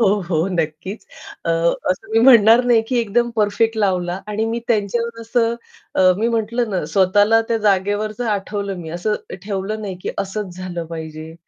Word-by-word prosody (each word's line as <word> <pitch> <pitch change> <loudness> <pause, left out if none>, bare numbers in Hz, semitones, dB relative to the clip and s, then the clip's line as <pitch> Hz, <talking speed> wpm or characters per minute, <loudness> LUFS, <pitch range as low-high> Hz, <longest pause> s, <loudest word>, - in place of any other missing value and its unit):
हो, 225 - +4 0.2
हो 165 -1 +1
नक्कीच. 170 +4 -3 0.4
अ, - - 0 0.4
असं 185 +3 -4
मी 225 - +4
म्हणणार 230 -2 +7
नाही 240 -2 +4
की 250 -2 +1
एकदम 235 +2 +1
परफेक्ट 220 +1 +1
लावला 185 -2 0
आणि 210 +1 -1
मी 230 +1 -2
त्यांच्यावर 230 +1 -1
असं 230 0 0 0.4
अ, 185 -1 +5
मी 225 +2 +1
म्हटलं 230 0 -1
ना, 185 -4 -1
स्वतःला 205 +3 +4
त्या 230 - +1
जागेवरच 205 +2 0
आठवलं 200 -3 -2
मी 160 -2 -7
असं 175 +6 -1 0.3
ठेवलं 205 +1 -3
नाही 195 -3 -5
की - - -2
असच 195 -2 -4
झालं 180 -2 -5
पाहिजे, 160 -1 -8
205 Hz, 165 wpm, -20 LUFS, 185-225 Hz, 0.4 s, म्हणणार